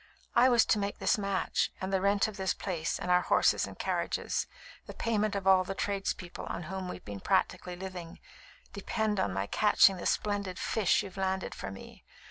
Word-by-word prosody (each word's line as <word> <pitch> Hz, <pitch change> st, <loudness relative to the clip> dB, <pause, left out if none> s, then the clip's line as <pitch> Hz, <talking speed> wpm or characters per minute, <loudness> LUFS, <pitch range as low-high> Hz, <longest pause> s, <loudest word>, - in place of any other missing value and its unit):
I 245 Hz, +2 st, +6 dB
was 240 Hz, -2 st, +5 dB
to 215 Hz, -, +2 dB
make 200 Hz, 0 st, -2 dB
this -, -, +1 dB
match; 195 Hz, -2 st, 0 dB
and 190 Hz, +1 st, -4 dB
the 190 Hz, -, +2 dB
rent 200 Hz, +1 st, +3 dB
of 215 Hz, -, -7 dB
this 190 Hz, -2 st, -1 dB
place, 170 Hz, -4 st, -2 dB
and 180 Hz, -, -2 dB
our 180 Hz, 0 st, +5 dB
horses -, -, +3 dB
and -, -, -10 dB
carriages, -, -, -1 dB, 0.4 s
the -, -, -8 dB
payment 215 Hz, -2 st, 0 dB
of 195 Hz, -1 st, -3 dB
all 190 Hz, -1 st, +6 dB
the 195 Hz, +1 st, -5 dB
tradespeople 195 Hz, -3 st, -3 dB
on 175 Hz, -, -4 dB
whom 190 Hz, +2 st, -5 dB
we've -, -, -8 dB
been 100 Hz, -1 st, -6 dB
practically 180 Hz, -, 0 dB
living, 180 Hz, -2 st, -8 dB, 0.5 s
depend 215 Hz, -2 st, -1 dB
on 100 Hz, -, +1 dB
my 95 Hz, +1 st, -2 dB
catching 195 Hz, -, +4 dB
the -, -, -3 dB
splendid 200 Hz, -3 st, -1 dB
'fish' 215 Hz, -5 st, +1 dB
you've 195 Hz, -1 st, -10 dB
landed 190 Hz, 0 st, -1 dB
for -, -, -6 dB
me. 95 Hz, 0 st, -11 dB
190 Hz, 195 wpm, -30 LUFS, 180-205 Hz, 0.5 s, I